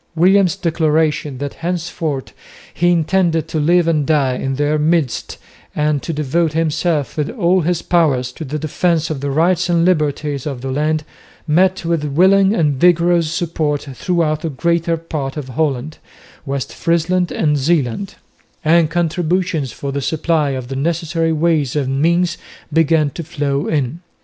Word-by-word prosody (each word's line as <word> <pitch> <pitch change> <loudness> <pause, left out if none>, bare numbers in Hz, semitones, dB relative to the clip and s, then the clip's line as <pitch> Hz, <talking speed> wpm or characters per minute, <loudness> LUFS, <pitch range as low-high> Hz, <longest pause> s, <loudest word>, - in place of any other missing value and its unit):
William's 185 +2 +4
declaration 155 -5 0
that 140 +1 -4
henceforth 165 -5 -3 0.4
he 175 +1 +2
intended 170 -1 +1
to 160 - -1
live 170 +3 +3
and 155 -3 +2
die 145 -5 +2
in 135 +1 -2
their 145 +2 0
midst 155 -4 0 0.4
and 150 -1 +1
to - - -4
devote 155 +2 0
himself 160 -2 0
with 150 -2 -1
all 185 -4 +2
his 170 +1 -1
powers 140 -8 +1
to 160 - -8
the 150 +1 -4
defence 160 +1 0
of 140 -4 -4
the 140 - -2
rights 175 +5 +1
and 170 -1 +3
liberties 150 -5 0
of 135 -4 -5
the 135 0 -4
land 155 +3 0 0.4
met 185 +3 +2
with 165 -2 0
willing 190 +7 +4
and 150 -9 +1
vigorous 170 -1 +3
support 160 -3 -1
throughout 155 0 0
the 165 - -2
greater 170 +3 0
part 155 -4 -5
of 140 -3 -5
Holland, 145 +1 -2 0.5
West 135 -1 -3
Friesland 170 +2 0
and 150 -2 +1
Zeeland; 150 - 0 0.5
and 165 0 +4
contributions 170 -3 -1
for 140 +5 -5
the 140 +1 -3
supply 155 +1 0
of 130 -2 -4
the 135 - -5
necessary 165 +2 -1
ways 155 -4 +1
and 135 -1 -1
means 170 +2 +1 0.3
began 160 -2 +3
to 170 - -6
flow 145 -3 -2
in. 145 0 -1
160 Hz, 155 wpm, -18 LUFS, 145-170 Hz, 0.5 s, William's